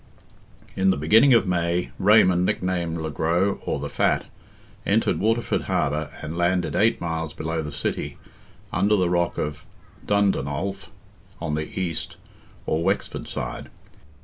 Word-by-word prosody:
In 95 Hz, 0 st, +3 dB
the 95 Hz, -, +2 dB
beginning 110 Hz, -, +5 dB
of 115 Hz, -, +4 dB
May, 85 Hz, -1 st, 0 dB
Raymond, 95 Hz, -4 st, +5 dB
nicknamed 90 Hz, -3 st, -1 dB
le 80 Hz, -1 st, -4 dB
gros, 85 Hz, +7 st, +1 dB
or -, -, 0 dB
the 70 Hz, +1 st, -4 dB
Fat, -, -, +1 dB, 0.6 s
entered -, -, +1 dB
Waterford 115 Hz, +3 st, 0 dB
harbour, 75 Hz, +2 st, 0 dB
and 80 Hz, -, -5 dB
landed 90 Hz, 0 st, +1 dB
eight 110 Hz, +2 st, +3 dB
miles 80 Hz, -3 st, -3 dB
below 80 Hz, 0 st, -2 dB
the 75 Hz, -1 st, -5 dB
city, 75 Hz, +1 st, -3 dB, 0.6 s
under 100 Hz, +4 st, +3 dB
the 90 Hz, -3 st, +1 dB
rock 85 Hz, -1 st, +1 dB
of 75 Hz, 0 st, -3 dB, 0.4 s
Dundonolf, 95 Hz, -1 st, 0 dB, 0.5 s
on 75 Hz, -3 st, -3 dB
the 75 Hz, +4 st, -3 dB
east, 85 Hz, -4 st, -3 dB, 0.5 s
or 80 Hz, +1 st, 0 dB
Wexford -, -, -1 dB
side. -, -, -5 dB
85 Hz, 140 wpm, -24 LUFS, 80-95 Hz, 0.6 s, beginning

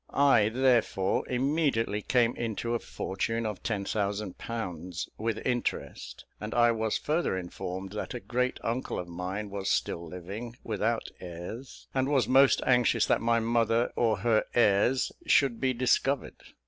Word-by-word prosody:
I, 135 Hz, -7 st, +5 dB
therefore, 120 Hz, -6 st, +2 dB
immediately 125 Hz, -5 st, +1 dB
came 120 Hz, +1 st, +2 dB
into 115 Hz, 0 st, -2 dB
a 120 Hz, -, 0 dB
fortune 115 Hz, +5 st, -3 dB
of 105 Hz, -3 st, -4 dB
ten 100 Hz, -3 st, -2 dB
thousand 100 Hz, -2 st, -2 dB
pounds, 90 Hz, -6 st, -5 dB
with 110 Hz, 0 st, -1 dB
interest; 120 Hz, -2 st, -3 dB
and 105 Hz, +1 st, -5 dB
I 120 Hz, -1 st, +5 dB
was 110 Hz, -1 st, 0 dB
further 155 Hz, -, 0 dB
informed 95 Hz, +1 st, -5 dB
that 105 Hz, +4 st, -5 dB
a -, -, -3 dB
great 125 Hz, +2 st, -1 dB
uncle 120 Hz, +3 st, -2 dB
of 90 Hz, -, -4 dB
mine 95 Hz, +4 st, -5 dB
was 100 Hz, -1 st, -3 dB
still 85 Hz, -, 0 dB
living, 95 Hz, +8 st, -7 dB
without -, -, -1 dB
heirs, 90 Hz, +9 st, -8 dB
and 130 Hz, 0 st, +1 dB
was 135 Hz, -6 st, +2 dB
most 135 Hz, +2 st, +5 dB
anxious 125 Hz, -2 st, +3 dB
that -, -, +2 dB
my 115 Hz, 0 st, +2 dB
mother 115 Hz, +1 st, +1 dB
or 115 Hz, -2 st, +2 dB
her 110 Hz, -1 st, +3 dB
heirs 120 Hz, +3 st, +3 dB, 0.2 s
should 135 Hz, -5 st, +4 dB
be 130 Hz, -1 st, +2 dB
discovered. 130 Hz, +2 st, +1 dB
115 Hz, 150 wpm, -29 LUFS, 100-125 Hz, 0.2 s, I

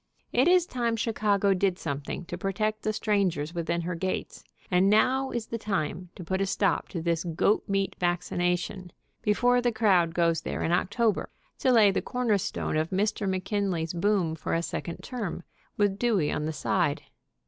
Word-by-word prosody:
It 255 Hz, +6 st, +4 dB
is 360 Hz, -1 st, +5 dB
time 235 Hz, -6 st, -1 dB
Chicago 210 Hz, -3 st, +1 dB
did 185 Hz, -1 st, +1 dB
something 145 Hz, +2 st, -4 dB
to 185 Hz, -, -5 dB
protect 215 Hz, +2 st, -2 dB
the 215 Hz, -, 0 dB
strangers 190 Hz, -8 st, 0 dB
within 170 Hz, 0 st, -1 dB
her 175 Hz, +2 st, -3 dB
gates, 185 Hz, +3 st, -4 dB, 0.3 s
and 185 Hz, +2 st, +4 dB
now 260 Hz, +5 st, +3 dB
is 235 Hz, -2 st, -3 dB
the 230 Hz, -, -5 dB
time 180 Hz, -4 st, -2 dB
to 180 Hz, -, -8 dB
put 190 Hz, +3 st, -2 dB
a 195 Hz, -, +1 dB
stop 195 Hz, 0 st, +1 dB
to 170 Hz, -4 st, -4 dB
this 170 Hz, -1 st, 0 dB
goat 175 Hz, +4 st, +1 dB
meat 195 Hz, 0 st, 0 dB
vaccination, 180 Hz, +1 st, -1 dB, 0.3 s
before 245 Hz, +4 st, +3 dB
the 240 Hz, 0 st, +1 dB
crowd 190 Hz, -7 st, +3 dB
goes 170 Hz, -1 st, +2 dB
there -, -, -3 dB
in 165 Hz, -, 0 dB
October, 205 Hz, +4 st, +1 dB, 0.3 s
to 260 Hz, -, +3 dB
lay 220 Hz, -5 st, +6 dB
the -, -, -1 dB
cornerstone 220 Hz, -10 st, -1 dB
of 155 Hz, +1 st, 0 dB
Mr. 200 Hz, +1 st, 0 dB
McKinley's 185 Hz, -3 st, -1 dB
boom 180 Hz, -2 st, +1 dB
for 160 Hz, -, -3 dB
a 165 Hz, -, 0 dB
second 170 Hz, 0 st, -5 dB
term, 215 Hz, -9 st, -4 dB, 0.3 s
with 205 Hz, -1 st, +1 dB
Dewey 210 Hz, -11 st, +2 dB
on 150 Hz, -, -2 dB
the -, -, -1 dB
side. 175 Hz, -3 st, 0 dB
195 Hz, 175 wpm, -27 LUFS, 170-215 Hz, 0.3 s, lay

